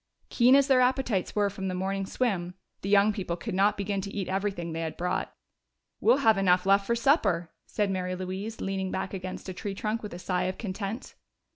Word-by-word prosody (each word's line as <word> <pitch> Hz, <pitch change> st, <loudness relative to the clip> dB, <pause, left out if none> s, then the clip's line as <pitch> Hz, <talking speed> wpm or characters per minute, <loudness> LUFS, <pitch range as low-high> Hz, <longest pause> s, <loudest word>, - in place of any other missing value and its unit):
Keen 250 Hz, +2 st, +5 dB
as 280 Hz, 0 st, +5 dB
their 260 Hz, -2 st, +5 dB
appetites 250 Hz, -6 st, +1 dB
were 205 Hz, -1 st, +2 dB
from 190 Hz, -1 st, -5 dB
the 185 Hz, -, -2 dB
morning's 195 Hz, +1 st, -2 dB
swim, 180 Hz, -8 st, -1 dB, 0.3 s
the 195 Hz, -, -4 dB
young 205 Hz, +1 st, +5 dB
people 185 Hz, -4 st, -3 dB
could 215 Hz, +3 st, -5 dB
not 195 Hz, +3 st, +3 dB
begin 200 Hz, 0 st, -1 dB
to 200 Hz, -, -6 dB
eat 195 Hz, -2 st, -4 dB
everything 190 Hz, -3 st, -2 dB
they 165 Hz, -, -3 dB
had 160 Hz, -1 st, -4 dB
brought. 180 Hz, +1 st, -1 dB, 0.7 s
"We'll -, -, +5 dB
have 220 Hz, -3 st, +5 dB
enough 180 Hz, -1 st, +3 dB
left 195 Hz, 0 st, +4 dB
for 235 Hz, -, +2 dB
supper," 235 Hz, -, +2 dB, 0.2 s
said 205 Hz, -2 st, 0 dB
Mary 185 Hz, -1 st, -2 dB
Louise, 190 Hz, +4 st, -5 dB
leaning 195 Hz, -1 st, -2 dB
back 190 Hz, -, -3 dB
against 185 Hz, 0 st, -6 dB
a 185 Hz, -, -4 dB
tree 195 Hz, +2 st, -5 dB
trunk 215 Hz, +3 st, -2 dB
with 210 Hz, -5 st, -7 dB
a -, -, -6 dB
sigh 180 Hz, 0 st, -1 dB
of 185 Hz, 0 st, -2 dB
content. 205 Hz, +3 st, -5 dB
195 Hz, 215 wpm, -28 LUFS, 185-210 Hz, 0.7 s, Keen